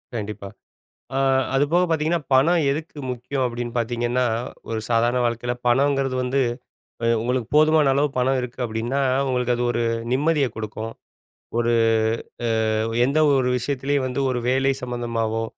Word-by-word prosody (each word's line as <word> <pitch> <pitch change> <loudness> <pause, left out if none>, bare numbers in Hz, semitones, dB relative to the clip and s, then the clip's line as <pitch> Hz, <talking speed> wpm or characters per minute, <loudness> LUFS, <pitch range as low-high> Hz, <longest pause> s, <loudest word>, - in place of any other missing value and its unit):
கண்டிப்பா. 105 -2 -5 0.7
ஆ. - - +2 0.4
அது 135 - +4
போக 175 +1 +5
பார்த்தீங்கன்னா, 160 +1 +1
பணம் 165 +6 +4
எதுக்கு 155 +2 -5
முக்கியம்? 125 +2 -3
அப்டின்னு 120 0 -5
பார்த்தீங்கன்னா, 120 +1 0 0.4
ஒரு 115 -1 -2
சாதாரண 120 +1 +2
வாழ்க்கையில 120 +1 -2
பணங்கறது 135 +1 +2
வந்து 130 +2 0 0.7
அ - - +2
உங்களுக்கு 125 0 -1
போதுமான 155 -1 +5
அளவு 145 +1 +2
பணம் 130 +1 +2
இருக்கு 125 +1 -7
அப்டின்னா, 115 +5 -2 0.3
உங்களுக்கு 125 -1 0
அது 120 - -2
ஒரு 120 - -1 0.3
நிம்மதிய 145 +1 +2
குடுக்கும். 110 +1 -5 0.7
ஒரு 120 0 +2 1.0
அ - - 0 0.3
எந்த 140 +3 +1 0.2
ஒரு 125 -1 +1
விஷயத்திலயும் 140 +2 -1
வந்து 130 +2 -2
ஒரு 125 - -1
வேலை 135 +1 +2
சம்மந்தமாவோ, 115 -2 -2
125 Hz, 140 wpm, -23 LUFS, 120-140 Hz, 1.0 s, போக